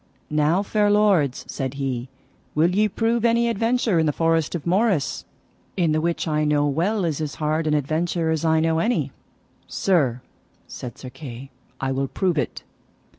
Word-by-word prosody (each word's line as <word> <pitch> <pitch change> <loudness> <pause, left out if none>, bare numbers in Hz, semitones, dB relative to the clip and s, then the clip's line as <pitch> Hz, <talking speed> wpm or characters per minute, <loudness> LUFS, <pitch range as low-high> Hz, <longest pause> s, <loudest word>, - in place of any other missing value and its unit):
Now, 155 +5 +2
fair 205 0 +1
lords, 200 -10 +3
said 135 -1 -4
he, 130 -2 -3 0.5
will 165 +4 +3
ye 210 +2 +3
prove 225 +3 0
any 235 0 +3
adventure 230 -3 +1
in 160 - +2
the - - +3
forest 165 +1 +1
of 165 - -5
Morris, 190 -3 +1 0.5
in 170 -4 +2
the 155 0 +1
which 170 +1 -1
I 155 -1 +1
know 150 -1 +2
well 175 +8 0
is 160 -2 -2
as 150 -2 -3
hard 155 +1 -1
an 150 - +2
adventure 160 +3 0
as 160 -1 -1
I 160 -1 +3
know 160 0 +1
any. 235 +8 0 0.6
Sir, 140 -11 +1 0.5
said 125 - -8
Sir 130 - -9
Kay, 135 -2 -9 0.3
I 135 0 -1
will 135 +1 -1
prove 175 +1 0
it. - - -4
160 Hz, 175 wpm, -23 LUFS, 145-195 Hz, 0.6 s, lords